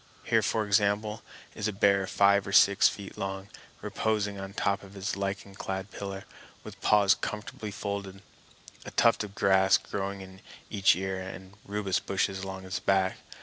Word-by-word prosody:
Here, -, -, +3 dB
for 110 Hz, -1 st, 0 dB
example, 105 Hz, +2 st, +1 dB, 0.3 s
is 105 Hz, -, -2 dB
a -, -, 0 dB
bear 100 Hz, -1 st, +3 dB
five 100 Hz, 0 st, +3 dB
or -, -, -4 dB
six 100 Hz, +1 st, +6 dB
feet 100 Hz, -1 st, -9 dB
long, 95 Hz, +1 st, -4 dB, 0.3 s
reposing 105 Hz, -2 st, -1 dB
on 95 Hz, 0 st, -7 dB
top 100 Hz, -2 st, 0 dB
of 100 Hz, 0 st, -14 dB
his 95 Hz, 0 st, -3 dB
lichen 100 Hz, 0 st, -4 dB
clad 95 Hz, 0 st, -5 dB
pillar, 100 Hz, -1 st, -6 dB, 0.4 s
with -, -, -11 dB
paws 100 Hz, -1 st, +5 dB
comfortably 105 Hz, 0 st, -5 dB
folded, 100 Hz, -1 st, -5 dB, 0.6 s
a -, -, -7 dB
tuft 115 Hz, -2 st, +3 dB
of 100 Hz, -1 st, -9 dB
grass 95 Hz, 0 st, +4 dB
growing 100 Hz, -1 st, -4 dB
in 95 Hz, 0 st, -12 dB, 0.3 s
each 100 Hz, -3 st, +4 dB
ear 95 Hz, +1 st, -3 dB
and 95 Hz, 0 st, -9 dB
rubus 100 Hz, -2 st, -1 dB
bushes 95 Hz, 0 st, -1 dB
along 95 Hz, 0 st, -6 dB
his 95 Hz, +1 st, -4 dB
back. 95 Hz, -1 st, +1 dB
100 Hz, 165 wpm, -29 LUFS, 95-100 Hz, 0.6 s, six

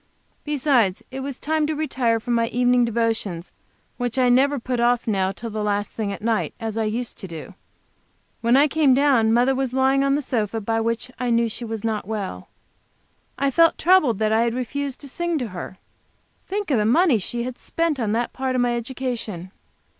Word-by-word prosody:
Besides, 265 Hz, -9 st, +1 dB
it 265 Hz, -, -5 dB
was 270 Hz, -1 st, -5 dB
time 310 Hz, 0 st, 0 dB
to 310 Hz, -, -1 dB
retire 255 Hz, -7 st, 0 dB
for 240 Hz, -, -5 dB
my 230 Hz, -1 st, +2 dB
evening 245 Hz, +1 st, +3 dB
devotions 225 Hz, -6 st, -2 dB, 0.5 s
which 245 Hz, 0 st, -3 dB
I 255 Hz, -1 st, +4 dB
never 275 Hz, +4 st, +4 dB
put 250 Hz, 0 st, -3 dB
off 240 Hz, 0 st, +2 dB
now 195 Hz, -4 st, +1 dB
till 225 Hz, +3 st, -7 dB
the 215 Hz, 0 st, -3 dB
last 205 Hz, 0 st, -1 dB
thing 210 Hz, -3 st, -3 dB
at 200 Hz, -, -7 dB
night, 225 Hz, -1 st, 0 dB
as 225 Hz, -2 st, -4 dB
I 225 Hz, -1 st, 0 dB
used 235 Hz, +3 st, -4 dB
to 190 Hz, -, -7 dB
do. 165 Hz, +3 st, -9 dB, 0.9 s
When 235 Hz, +3 st, +4 dB
I 290 Hz, +2 st, +5 dB
came 295 Hz, -3 st, +3 dB
down, 260 Hz, -6 st, +3 dB
Mother 245 Hz, +3 st, +3 dB
was 265 Hz, -1 st, -2 dB
lying 265 Hz, +1 st, +3 dB
on 275 Hz, 0 st, +2 dB
the 295 Hz, -, 0 dB
sofa, 225 Hz, -4 st, -1 dB
by 225 Hz, +2 st, -1 dB
which 230 Hz, +2 st, -2 dB
I 250 Hz, -1 st, -1 dB
knew 235 Hz, 0 st, +3 dB
she 230 Hz, +2 st, -6 dB
was 225 Hz, -2 st, -5 dB
not 220 Hz, -4 st, -2 dB
well. 200 Hz, -, -5 dB, 0.9 s
I 275 Hz, +1 st, +1 dB
felt 330 Hz, +4 st, +4 dB
troubled 320 Hz, -, +4 dB
that 215 Hz, +1 st, +1 dB
I 220 Hz, -, +3 dB
had 235 Hz, 0 st, 0 dB
refused 270 Hz, +2 st, -3 dB
to 285 Hz, -, -9 dB
sing 345 Hz, +4 st, -2 dB
to 245 Hz, -6 st, -3 dB
her. 185 Hz, 0 st, -7 dB, 0.7 s
Think 405 Hz, -3 st, -3 dB
of 250 Hz, -, +3 dB
the 210 Hz, -, +1 dB
money 280 Hz, 0 st, +4 dB
she 235 Hz, +5 st, -3 dB
had 250 Hz, 0 st, -6 dB
spent 330 Hz, -4 st, -1 dB
on 220 Hz, -4 st, 0 dB
that 235 Hz, +1 st, -1 dB
part 260 Hz, -1 st, -2 dB
of 250 Hz, -, +2 dB
my 240 Hz, -1 st, +1 dB
education! 235 Hz, -7 st, -5 dB
240 Hz, 205 wpm, -23 LUFS, 220-270 Hz, 0.9 s, I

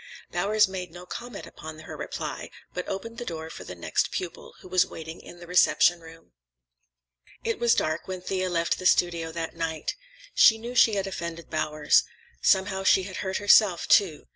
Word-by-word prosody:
Bowers 210 Hz, +1 st, +3 dB
made 185 Hz, -1 st, -5 dB
no 175 Hz, +1 st, -11 dB
comment 240 Hz, +6 st, -7 dB
upon 155 Hz, 0 st, -10 dB
this 155 Hz, -, -12 dB
reply, -, -, -5 dB, 0.2 s
but 180 Hz, -, -4 dB
opened 230 Hz, +4 st, -5 dB
the -, -, -4 dB
door 160 Hz, -5 st, -6 dB
for -, -, -9 dB
the 90 Hz, -, -8 dB
next 85 Hz, -, -1 dB
pupil, 175 Hz, -3 st, -6 dB
who -, -, -12 dB
was 185 Hz, 0 st, +4 dB
waiting 160 Hz, 0 st, -9 dB
in 175 Hz, -, -12 dB
the 175 Hz, -, -10 dB
reception 175 Hz, 0 st, +4 dB
room. 165 Hz, 0 st, -15 dB, 1.1 s
It 230 Hz, -, -2 dB
was 235 Hz, -1 st, +4 dB
dark 155 Hz, +1 st, -1 dB
when 185 Hz, -1 st, -5 dB
Thea 185 Hz, 0 st, -2 dB
left 170 Hz, -1 st, 0 dB
the 185 Hz, -, +2 dB
studio 170 Hz, -3 st, +2 dB
that 165 Hz, -1 st, -4 dB
night. 160 Hz, -1 st, -3 dB, 0.4 s
She 220 Hz, -, +6 dB
knew 235 Hz, +2 st, -7 dB
she 225 Hz, -3 st, +5 dB
had 195 Hz, -1 st, -1 dB
offended 170 Hz, -3 st, -6 dB
Bowers. 150 Hz, -1 st, +2 dB, 0.4 s
Somehow 190 Hz, 0 st, +2 dB
she 190 Hz, 0 st, +4 dB
had 185 Hz, 0 st, -7 dB
hurt 190 Hz, -1 st, -2 dB
herself, 205 Hz, -3 st, +5 dB
too. 180 Hz, -7 st, +3 dB
180 Hz, 185 wpm, -26 LUFS, 165-195 Hz, 1.1 s, She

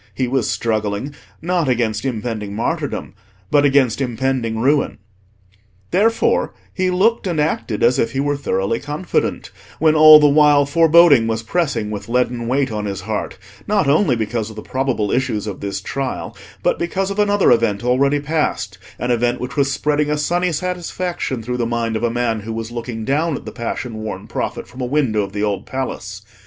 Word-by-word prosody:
He 130 Hz, -, 0 dB
was 130 Hz, -1 st, 0 dB
struggling 110 Hz, +4 st, -2 dB, 0.3 s
not 175 Hz, -4 st, 0 dB
against 115 Hz, -2 st, 0 dB
impending 110 Hz, -4 st, -3 dB
martyrdom, 115 Hz, -, -3 dB, 0.4 s
but 145 Hz, -1 st, +4 dB
against 135 Hz, -3 st, +3 dB
impending 120 Hz, -2 st, -1 dB
ruin. 140 Hz, +5 st, +1 dB, 0.9 s
Therefore 225 Hz, +4 st, +2 dB, 0.2 s
he 185 Hz, -1 st, 0 dB
looked 200 Hz, +4 st, +2 dB
and 170 Hz, -4 st, -1 dB
acted 150 Hz, -7 st, -1 dB
as 120 Hz, +2 st, +4 dB
if 115 Hz, -, 0 dB
he 135 Hz, -, -1 dB
were 145 Hz, +1 st, 0 dB
thoroughly 105 Hz, -5 st, -1 dB
confident, 150 Hz, +5 st, -2 dB, 0.3 s
when 155 Hz, 0 st, +3 dB
all 155 Hz, 0 st, +9 dB
the 150 Hz, -, +5 dB
while 145 Hz, -1 st, +5 dB
foreboding 165 Hz, -4 st, +5 dB
was 115 Hz, 0 st, -2 dB
pressing 115 Hz, -6 st, -1 dB
with 105 Hz, +1 st, -6 dB
leaden 120 Hz, -1 st, 0 dB
weight 130 Hz, 0 st, 0 dB
on 105 Hz, -1 st, -3 dB
his 100 Hz, -1 st, -4 dB
heart, 105 Hz, 0 st, -4 dB, 0.3 s
not 200 Hz, -7 st, +2 dB
only 145 Hz, -1 st, +3 dB
because 110 Hz, 0 st, -2 dB
of 110 Hz, -, -11 dB
the 105 Hz, -, -8 dB
probable 130 Hz, -6 st, -1 dB
issues 120 Hz, -5 st, -1 dB
of 105 Hz, -3 st, -5 dB
this 100 Hz, -1 st, -4 dB
trial, 130 Hz, +6 st, -4 dB, 0.3 s
but -, -, +1 dB
because 190 Hz, +3 st, -1 dB
of 200 Hz, -, -4 dB
another 205 Hz, -1 st, +3 dB
event 115 Hz, -2 st, +2 dB
already 140 Hz, +4 st, +2 dB
past—an 125 Hz, -, -3 dB
event 120 Hz, +1 st, +1 dB
which 125 Hz, -, -5 dB
was 140 Hz, -2 st, +1 dB
spreading 150 Hz, +2 st, 0 dB
a 150 Hz, -, 0 dB
sunny 175 Hz, +4 st, 0 dB
satisfaction 175 Hz, -6 st, -3 dB
through 125 Hz, +2 st, -3 dB
the 120 Hz, -, 0 dB
mind 115 Hz, -1 st, -1 dB
of 110 Hz, -, -2 dB
a 120 Hz, -, +2 dB
man 115 Hz, -1 st, -1 dB
who 110 Hz, +2 st, -6 dB
was 115 Hz, +1 st, -5 dB
looking 115 Hz, -2 st, -5 dB
down 150 Hz, +4 st, 0 dB
at -, -, -8 dB
the 110 Hz, -, -6 dB
passion 115 Hz, 0 st, -5 dB
worn 110 Hz, 0 st, -6 dB
prophet -, -, -4 dB
from 130 Hz, -, -10 dB
a -, -, -1 dB
window 125 Hz, -5 st, +1 dB
of 100 Hz, -1 st, -4 dB
the 105 Hz, +1 st, -3 dB
Old 100 Hz, -2 st, -2 dB
Palace. 105 Hz, -7 st, -5 dB
125 Hz, 185 wpm, -19 LUFS, 110-150 Hz, 0.9 s, all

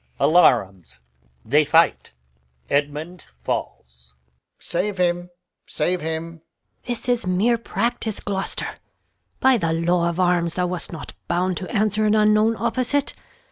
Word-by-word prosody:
Alarums. 105 Hz, -, +3 dB, 0.7 s
Fight. 165 Hz, -, +3 dB, 0.6 s
[Edmund 150 Hz, +4 st, -2 dB, 0.2 s
falls.] 60 Hz, 0 st, -5 dB, 0.2 s
Alb. 60 Hz, -, -45 dB, 0.2 s
Save 190 Hz, +3 st, -3 dB
him, 175 Hz, 0 st, 0 dB, 0.4 s
save 180 Hz, 0 st, -1 dB
him! 160 Hz, +1 st, -4 dB
Gon. -, -, -29 dB, 0.5 s
This 240 Hz, -1 st, -3 dB
is 245 Hz, -6 st, 0 dB
mere 215 Hz, +6 st, +2 dB
practice, 230 Hz, -2 st, -2 dB
Gloucester. 195 Hz, -1 st, -3 dB, 0.6 s
By 260 Hz, -2 st, +4 dB
th' -, -, -8 dB
law 170 Hz, +1 st, +1 dB
of 170 Hz, +1 st, -4 dB
arms 175 Hz, -2 st, +1 dB
thou 180 Hz, -, 0 dB
wast 180 Hz, -1 st, -4 dB
not 165 Hz, -, -8 dB
bound 180 Hz, +1 st, 0 dB
to 185 Hz, -, -6 dB
answer 215 Hz, -1 st, +1 dB
An 210 Hz, -, +3 dB
unknown 215 Hz, +1 st, +3 dB
opposite. 255 Hz, +5 st, 0 dB
180 Hz, 130 wpm, -22 LUFS, 165-215 Hz, 0.7 s, By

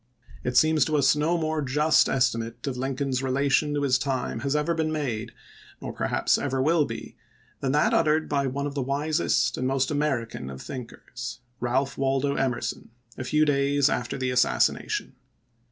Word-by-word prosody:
it 125 Hz, -, 0 dB
seems 155 Hz, -2 st, +5 dB
to 155 Hz, +1 st, 0 dB
us 135 Hz, 0 st, +4 dB
no 155 Hz, +4 st, +1 dB
more 155 Hz, -1 st, -1 dB
just 150 Hz, +3 st, +3 dB
estimate 115 Hz, -2 st, 0 dB
of 135 Hz, -3 st, -2 dB
Lincoln's 135 Hz, 0 st, -2 dB
relation 140 Hz, +3 st, +1 dB
to 145 Hz, -, 0 dB
his 130 Hz, -2 st, +3 dB
time 130 Hz, -4 st, -2 dB
has 140 Hz, +4 st, -1 dB
ever 150 Hz, +3 st, +1 dB
been 160 Hz, -1 st, -1 dB
made 120 Hz, -7 st, -3 dB, 0.2 s
— -, -, -22 dB
nor -, -, -6 dB
per -, -, -2 dB
haps -, -, +2 dB
ever 135 Hz, -2 st, -1 dB
will 155 Hz, +3 st, +3 dB
be -, -, -7 dB, 0.2 s
— -, -, -34 dB
than 135 Hz, -, 0 dB
that 150 Hz, -, +3 dB
uttered 155 Hz, 0 st, +2 dB
by 140 Hz, -2 st, 0 dB
one 140 Hz, +2 st, -2 dB
of 145 Hz, -, -3 dB
the 140 Hz, -, -2 dB
wisest 140 Hz, -2 st, 0 dB
and 130 Hz, -, 0 dB
most 135 Hz, 0 st, 0 dB
American 130 Hz, -, -2 dB
of 65 Hz, -1 st, -8 dB
thinkers, 120 Hz, -, -8 dB, 0.2 s
Ealph 130 Hz, +3 st, 0 dB
Waldo 135 Hz, +1 st, +1 dB
Emerson, 125 Hz, -4 st, -2 dB, 0.3 s
a -, -, -5 dB
few 150 Hz, +4 st, +2 dB
days 140 Hz, 0 st, +2 dB
after 120 Hz, 0 st, -2 dB
the 130 Hz, -1 st, -1 dB
assassination. 125 Hz, 0 st, +1 dB
135 Hz, 185 wpm, -26 LUFS, 125-150 Hz, 0.3 s, seems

